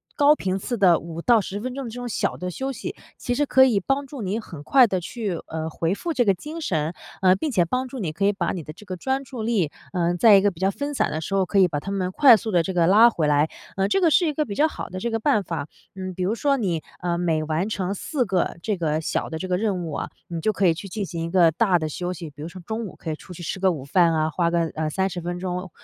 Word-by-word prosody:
高 290 0 +5
频 190 -8 -2
次 240 +5 -3
的 180 -4 +6
5 170 0 -7
到 235 +3 +4
10 195 +1 -5
分 250 +3 -5
钟 275 - -4
这 225 - -10
种 245 0 -5
小 - - -1
的 180 - -4
休 265 +9 -3
息， 255 - -6 0.2
其 245 - -2
实 290 - +2
可 265 -1 +5
以 230 -6 +3
帮 270 +8 -1
助 270 -4 -7
你 200 +4 -1
很 165 -9 -10
快 255 - +6
的 190 -2 -1
去， 195 -1 -4
呃， 160 0 -4
回 165 +3 -1
复 335 +11 -3
这 250 -6 +2
个 200 - +4
精 300 - -7
神， 160 - -1 0.3
呃， 185 -1 +5
并 295 +10 -2
且 185 -8 +3
帮 255 +8 -1
助 260 +1 -7
你， 175 -8 -2
可 195 +6 -1
以 205 - +3
把 185 -4 -1
你 175 - -5
的 155 - -9
这 175 - -15
个 190 -3 -6
专 265 +7 -1
注 250 -4 -7
力， 215 -9 +1 0.2
呃， 175 -1 +1
在 210 +3 +7
一 195 - +6
个 205 - +3
比 175 -5 -12
较 190 +1 +2
分 285 +7 -4
散 - - +1
的 155 - -3
时 195 +5 -3
候， 190 -1 +2
可 195 - +1
以 185 - +6
把 150 -4 -3
它 195 +6 -6
们 185 -2 -1
快 255 +3 +7
速 220 +1 -3
地 175 -5 +3
这 190 - -3
个 170 -2 +3
拉 225 +5 +7
回 160 -8 0
来， 150 +1 +3 0.3
呃， 195 0 +2
这 385 - +1
个 340 - +5
是 350 +3 +4
一 305 - 0
个 305 +1 0
比 205 -6 -6
较 305 - +4
好 - - -7
的 185 - -6
这 235 +4 -2
个 225 - 0
办 210 -2 +2
法。 160 -4 -4 0.3
嗯， 185 -1 -6
比 185 - -2
如 190 +4 +1
说 275 +4 +1
你， 180 - -1 0.2
呃， 175 -1 0
每 160 -3 +1
完 160 +6 -1
成 195 -2 -2
4 250 +5 -2
个 185 -4 0
这 215 - 0
个 155 -4 -1
小 160 - -2
的 160 - -4
这 185 - -5
个 180 - +1
任 195 -3 -1
务 160 - -5
啊， - - -3 0.2
你 170 -1 -4
就 215 - +2
可 200 -1 0
以 170 - +5
去 195 +4 -8
进 205 +1 -3
行 170 -2 -5
一 - - -4
个 170 -2 +5
大 185 +2 +3
的 155 -2 -2
休 175 +4 -3
息， 170 -4 -7
比 145 - -13
如 155 - -5
说 180 +2 -10
中 220 +1 -3
午 - - -11
可 160 - -5
以 - - -2
出 180 - -12
去 175 - -9
吃 190 - -4
个 190 0 +3
午 145 -6 -6
饭 170 +4 +4
啊， 155 0 +1
花 170 +2 +1
个， 170 0 +1
呃， 155 0 -2
30 190 +2 -1
分 175 +1 -4
钟 180 0 -4
190 Hz, 315 characters per minute, -24 LUFS, 170-225 Hz, 0.3 s, 在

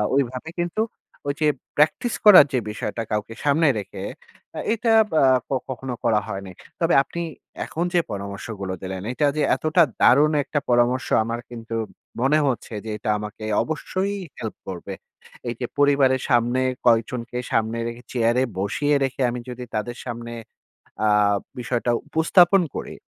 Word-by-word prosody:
ওইভাবে 130 +2 -1
কিন্তু 175 +5 -1 0.5
ঐযে 145 +2 +1 0.3
practice 155 +10 +2
করার 195 -8 +10
যে 130 - +3
বিষয়টা 105 +2 -4
কাউকে 105 +1 -2
সামনে 155 +3 +4
রেখে 95 -1 -7 0.7
এটা 230 0 +1
আব - - -12
আ - - +5 0.5
কখনো 130 0 -4
করা 115 -3 +3
হয়নি। 95 -2 -6 0.3
তবে 165 0 +2
আপনি 170 - -6 0.4
এখন 170 +2 -2
যে 175 - +5
পরামর্শগুলো 100 -1 -5
দিলেন, 95 0 -5
এটা 145 +3 +2
যে 150 - +2
এতটা 155 +2 +3 0.2
দারুণ 145 +5 +6
একটা 145 - -1
পরামর্শ 120 +1 +2 0.2
আমার 115 +1 -3
কিন্তু 115 -1 -6 0.5
মনে 135 +4 +4
হচ্ছে 125 -3 -2
যে - - -5
এটা 110 +1 -4
আমাকে 105 +1 -7 0.2
অবশ্যই 185 +5 -2 0.3
help 110 - -5
করবে। 95 +1 -6 0.5
এই 120 - -1
যে 125 - -2
পরিবারের 140 -2 +4
সামনে, 120 0 +3 0.2
কয়েকজনকে 120 +1 +1
সামনে 110 +1 +1
রেখে, 120 +1 -6
চেয়ারে 120 +1 +2 0.2
বসিয়ে 145 +10 +1
রেখে 135 0 -2
আমি 120 +1 -4
যদি 125 0 -6
তাদের 120 +3 -3
সামনে 120 -1 -6 0.8
আ - - +4 0.5
বিষয়টা 120 0 -1 0.2
উপস্থাপন 175 +4 +5
করি - - -5
125 Hz, 145 wpm, -23 LUFS, 115-150 Hz, 0.8 s, করার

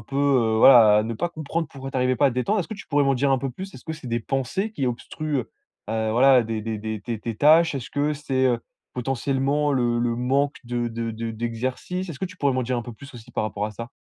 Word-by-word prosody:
peu, 120 +6 -7
heu, 130 -6 +3
voilà 110 -4 +8
à - - +2
ne 115 +1 -3
pas 175 +9 -1
comprendre 160 +1 -3
pourquoi 135 -1 -8
tu - - -4
arrivais 125 0 +2
pas 140 - +4
à - - +3
te - - -7
détendre. 200 - +1
Est-ce 175 - -5
que 220 - -5
tu 205 - -11
pourrais 145 0 +2
m'en 135 0 +3
dire 135 +2 +1
un 135 - +3
peu 135 +1 -3
plus? 190 +9 -8
Est-ce - - -12
que 160 - -4
c'est 155 -4 -11
des 120 -1 -1
pensées 135 - -2
qui 140 -11 -2
obstruent, 145 +4 -3
heu 125 - -5 0.4
heu, 110 0 0
voilà 130 +2 +6
des 110 0 -3
des 110 -1 -3
des 110 0 -4
tes 115 0 -4
tes 115 +1 -5
tâches? 160 +5 +5
Est-ce 135 0 -5
que 145 +1 0
c'est, 135 -3 -1
heu, 120 -2 +2 0.4
potentiellement 135 +3 0
le 120 -3 +1
le 120 0 0
manque 135 +4 +1
de 120 0 -2
de 115 0 -4
de 115 +1 -4
d'exercice? 125 - -3
Est-ce 150 - -7
que - - 0
tu 185 0 -13
pourrais 140 -5 +1
m'en 130 - 0
dire 125 +1 -1
un - - -4
peu 120 - -8
plus 140 +5 -13
aussi, 115 -2 -12
par - - -1
rapport 105 -1 -3
à - - -6
ça? 115 +3 -7
130 Hz, 280 wpm, -24 LUFS, 115-145 Hz, 0.4 s, voilà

